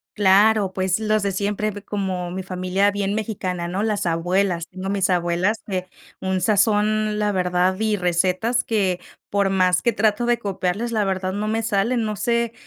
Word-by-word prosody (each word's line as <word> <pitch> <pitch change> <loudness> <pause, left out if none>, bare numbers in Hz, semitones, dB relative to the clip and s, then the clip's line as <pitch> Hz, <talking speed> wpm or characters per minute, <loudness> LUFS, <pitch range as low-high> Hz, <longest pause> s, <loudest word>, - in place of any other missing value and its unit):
Claro, 205 0 +4
pues, 190 +1 0
los 215 -1 +1
de 200 -1 0
siempre, 205 +2 -1
p 205 0 -9
como 190 -4 -3
mi 190 - -4
familia 185 +2 0
bien 200 -1 -1
mexicana, 185 -5 -3
¿no? 185 +4 -2
Las 210 -4 -1
abuelas, 175 +1 0
tengo 190 +1 -6
mis 195 -1 +1
abuelas 175 +4 +1
que, 185 -2 -3 0.3
un 190 0 -1
sazón, 215 +1 +2
la 210 -1 +1
verdad, 180 0 +1
y 215 -1 +1
recetas 185 +6 +1
que, 195 -5 0 0.3
por 200 -1 +1
más 185 -1 +2
que 235 - +2
trato 215 +2 +1
de 240 0 +2
copiarles, 200 +2 -2
la 220 -2 +1
verdad 190 -1 -2
no 210 +2 -2
me 220 +1 0
salen, 225 +2 0
no 215 -1 -2
sé 235 +1 0
200 Hz, 180 wpm, -22 LUFS, 185-215 Hz, 0.3 s, Claro